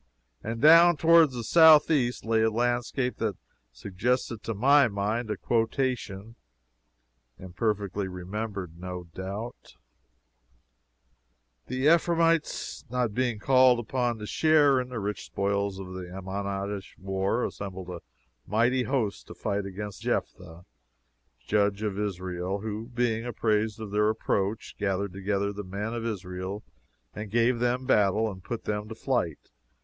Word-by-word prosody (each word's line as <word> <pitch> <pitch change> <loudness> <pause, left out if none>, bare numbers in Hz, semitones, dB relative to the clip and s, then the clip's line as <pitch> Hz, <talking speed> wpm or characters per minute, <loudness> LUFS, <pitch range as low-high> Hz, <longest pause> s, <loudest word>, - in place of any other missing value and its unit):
And 115 +1 -4
down 165 +4 +7
toward 165 0 +6
the 125 -3 -6
southeast 150 -5 +5
lay 110 0 +2
a 110 - +3
landscape 120 +2 -1
that 105 -5 -2 0.3
suggested 110 - -2
to 115 - -4
my 140 +5 +5
mind 105 +3 -2
a 105 - -2
quotation 115 -3 -1 1.0
(imperfectly 100 +1 -2
remembered, 95 -1 -6
no 90 0 -6
doubt:) 100 +6 -7 1.9
"The 130 +3 0
Ephraimites, 165 -1 +1
not 125 -3 -1
being 125 -1 0
called 130 +2 +5
upon 120 0 -1
to 105 - -7
share 145 0 +4
in 125 - -7
the 125 -3 -4
rich 105 0 -3
spoils 100 0 -1
of 95 -1 -8
the 90 -1 -7
Ammonitish 100 +1 -5
war, 95 +4 -1
assembled 95 -2 -6
a 85 -2 -7 0.5
mighty 120 +5 +2
host 120 -7 -2
to - - -10
fight 100 -1 -2
against 100 +1 -7
Jeptha, 90 -1 -4 0.8
Judge 100 +2 +1
of 105 -2 -2
Israel; 95 -1 -3
who, 110 +1 -5
being 120 -2 0
apprised 110 -2 0
of 110 -2 -7
their 105 +1 +2
approach, 105 -1 -1
gathered 100 -1 -1
together 100 +1 -1
the 105 +1 -6
men 100 +4 -4
of 115 -1 -3
Israel 95 -1 -5 0.5
and 105 0 -6
gave 120 +2 +2
them 125 +1 0
battle 110 -2 +2
and 95 -2 -11
put 120 +2 -5
them 105 0 -3
to 110 - -7
flight. 115 - -2
105 Hz, 135 wpm, -27 LUFS, 100-120 Hz, 1.9 s, down